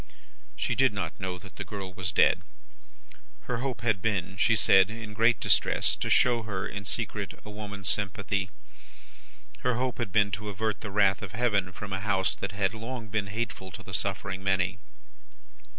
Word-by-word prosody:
She - - -1
did 130 -4 +4
not 100 -5 -4
know 95 -1 -3
that 95 0 -14
the - - -3
girl 95 -2 -6
was 95 -1 -3
dead. - - +4 1.0
Her 125 - -2
hope 130 0 -3
had 110 -5 +1
been, 95 -4 0
she 115 +3 +4
said 95 -2 +6
in 110 -1 -7
great 115 0 +4
distress, - - +3
to - - -2
show 120 -2 +4
her, 105 -4 -3
in 100 0 -6
secret, 105 -2 -2
a 105 - -7
woman's 100 -2 -5
sympathy. 100 -1 +1 1.1
Her 125 -1 +1
hope 125 +1 -1
had 115 -5 -2
been 100 +1 +3
to 105 +2 -4
avert 110 +2 -2
the 105 - -5
wrath 100 -1 +3
of 100 -2 -7
Heaven 105 -6 +1
from 100 +1 -7
a 95 - -1
House 100 -1 +1
that 100 -1 -5
had 100 0 0
long 115 0 -6
been 105 -2 -1
hateful 105 -2 -4
to 100 - -8
the 95 - -10
suffering 95 -1 -2
many. 95 0 +1
100 Hz, 180 wpm, -28 LUFS, 95-110 Hz, 1.1 s, said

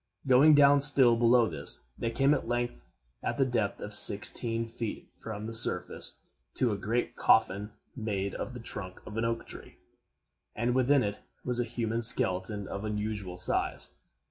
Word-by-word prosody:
Going 140 +4 +5
down 140 0 +5
still 135 -4 +5
below 120 0 +3
this, 75 -8 +1
they 115 - -3
came 135 +5 +1
at - - -3
length, 120 0 -2 0.5
at - - -4
the 135 - +2
depth 115 -5 -2
of 105 - -6
sixteen 115 +3 +4
feet 115 -1 -7
from 110 -1 -8
the 115 - -6
surface, 90 -6 +1 0.4
to 125 -3 0
a - - -2
great 115 +5 -3
coffin, 100 +2 +1 0.2
made 100 -5 -4
of 125 - -7
the - - -7
trunk 100 -5 -6
of 105 - -10
an 115 - -1
oak 115 0 -3
tree, - - -12 0.8
and 120 +3 -1
within 130 +1 +2
it 100 0 -4 0.3
was 125 -1 +1
a - - +1
human 115 -1 -3
skeleton 105 -4 +3
of 100 - -7
unusual 105 -3 -5
size. - - -2
115 Hz, 170 wpm, -28 LUFS, 105-125 Hz, 0.8 s, Going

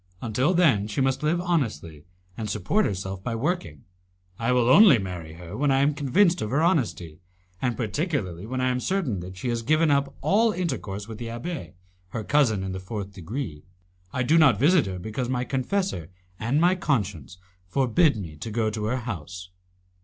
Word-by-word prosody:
Until 125 - +1
then 130 - +3
she 105 - -4
must 135 +1 +1
live 155 +3 +1
honestly, 105 - -2 0.3
and 110 -2 -4
support 110 - +1
herself 95 -1 -4
by 115 +1 -2
working. 115 - -2 0.6
I 115 +2 +1
will 125 -1 +3
only 165 - +8
marry 90 -5 -6
her 85 +3 -9
when 145 +4 +1
I 135 0 +3
am 145 +2 +3
convinced 170 +6 +2
of 105 - -2
her 145 +6 +1
honesty, 115 - 0 0.4
and 125 -2 -1
particularly 110 - -2
when 130 +2 -2
I 130 - +2
am 125 0 0
certain 150 - -1
that 90 +1 -8
she 120 +7 -3
has 120 -1 -1
given 155 +5 +3
up 140 0 +1
all 220 +2 +3
intercourse 110 - -3
with 110 -1 -8
the 120 - -5
abbé, 120 - -6 0.4
her 110 +4 -4
cousin 115 -8 +2
in 95 - -3
the 95 - -4
fourth 100 +1 -6
degree. 95 - -5 0.5
I 130 - -1
do 160 +6 +4
not 135 -9 +6
visit 155 - +4
her 95 -1 -4
because 110 +7 -4
my 125 -1 0
confessor 130 - -2 0.3
and 120 +7 +1
my 175 +3 +4
conscience 100 - -2 0.3
forbid 130 - +2
me 80 -7 -7
to 95 - -6
go 110 0 0
to 105 0 -3
her 120 +4 0
house." 90 - -6
120 Hz, 190 wpm, -25 LUFS, 95-145 Hz, 0.6 s, only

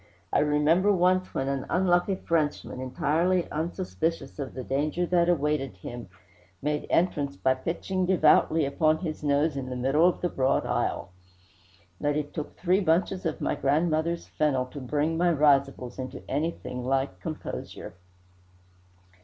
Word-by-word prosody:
I - - +4
remember 150 +6 +3
once 185 0 +2
when 135 - -1
an 135 -1 -2
unlucky 180 +1 +2
Frenchman, 155 -7 -1
entirely 165 +7 +1
unsuspicious 165 0 -3
of 135 -2 -5
the 130 - -5
danger 150 +7 -1
that 175 0 +2
awaited 150 - 0
him, 120 +2 -8 0.5
made 150 +4 -2
entrance 145 -5 +1
by 130 - +2
pitching 175 +7 -2
devoutly 160 -3 +4
upon 155 +3 +2
his 155 -2 -5
nose 145 +1 +2
in 130 -2 -4
the 125 - -4
middle 135 +7 +3
of 180 - -5
the 175 - 0
broad 130 -3 +1
aisle; - - -1 0.9
that 145 0 0
it 150 -1 -4
took 155 - -5
three 185 +1 +2
bunches 185 0 +1
of 155 - -4
my - - 0
grandmother's 160 +3 0
fennel 135 -4 0
to 145 - -7
bring 150 +5 -1
my 175 0 +3
risibles 140 -5 +2
into 130 0 -6
anything 145 -4 -3
like 135 -7 -1
composure. - - -6
150 Hz, 145 wpm, -27 LUFS, 135-170 Hz, 0.9 s, I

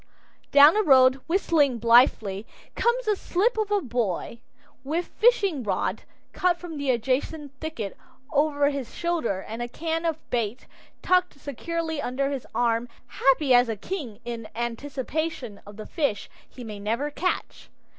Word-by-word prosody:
Down 285 +3 +8
the 430 - +3
road, 265 -5 +5
whistling 320 -7 +2
blithely, 225 -3 +3 0.3
comes 475 0 +1
a 420 - +3
slip 395 +5 0
of 435 -2 -1
a 410 -1 +2
boy, 235 - -2 0.4
with 325 +6 -1
fishing 405 - +2
rod, 210 - -1 0.3
cut 360 -1 +2
from 335 -4 -7
the 280 -1 -2
adjacent 265 +5 -1
thicket, 240 -11 -5 0.4
over 290 -1 +2
his 275 -4 -6
shoulder 325 - -1
and 225 +2 -6
a 240 - -2
can 325 +6 -3
of 325 -2 0
bait 235 0 -2 0.4
tucked 360 -5 +2
securely 320 +3 -4
under 275 +2 -1
his 275 -3 -5
arm, 235 0 +1 0.2
happy 270 0 +2
as 245 -1 +5
a 225 - -1
king 240 - -6
in 230 -2 -5
anticipation 260 +1 -4
of 205 0 -11
the 215 - -7
fish 285 -11 -2 0.2
he 250 - -10
may 210 -3 -7
never 230 +8 -2
catch. 350 +6 -3
275 Hz, 150 wpm, -25 LUFS, 235-330 Hz, 0.4 s, Down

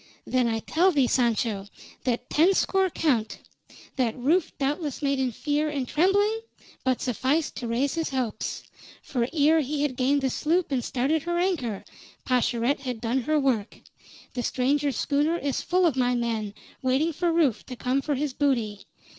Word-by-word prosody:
Then 255 -2 +1
I 225 -1 -1
tell 355 +10 +3
thee, 280 -6 +3
Sancho, 225 -5 0 0.4
that 245 0 -1
ten 350 +6 +4
score 385 0 +2
count, 255 -10 0 0.6
that 245 -3 0
Rufe 310 +8 +2
doubtless 290 +1 -2
made 275 -1 +1
in 260 -2 0
fear 295 +5 -1
and 275 -4 -3
trembling, 405 - +2 0.4
but 260 -2 +1
sufficed 265 +6 0
to 240 - -4
raise 255 +4 0
his 325 -1 -1
hopes. 245 -5 -3 0.4
For 245 -5 -1
ere 315 0 +4
he 295 0 -1
had 280 -4 -1
gained 270 +3 +2
the 265 -1 0
sloop 330 +3 0
and 255 -3 0
started 275 +6 0
her 345 +3 -2
anchor, 305 - -1 0.4
Pascherette 245 +1 +1
had 250 -4 -4
done 240 +3 0
her 305 +5 +1
work. 250 -7 0 0.5
The 245 - -2
stranger's 275 +2 0
schooner 300 +3 +1
is 280 -4 -2
full 365 +1 +2
of 320 -6 +2
my 250 -1 +2
men, 225 -4 -2 0.3
waiting 270 +6 +1
for 345 +2 0
Rufe 305 -9 +2
to 255 - -6
come 255 +3 0
for 290 0 -1
his 280 0 -2
booty. 235 -8 -1
270 Hz, 170 wpm, -26 LUFS, 245-310 Hz, 0.6 s, ten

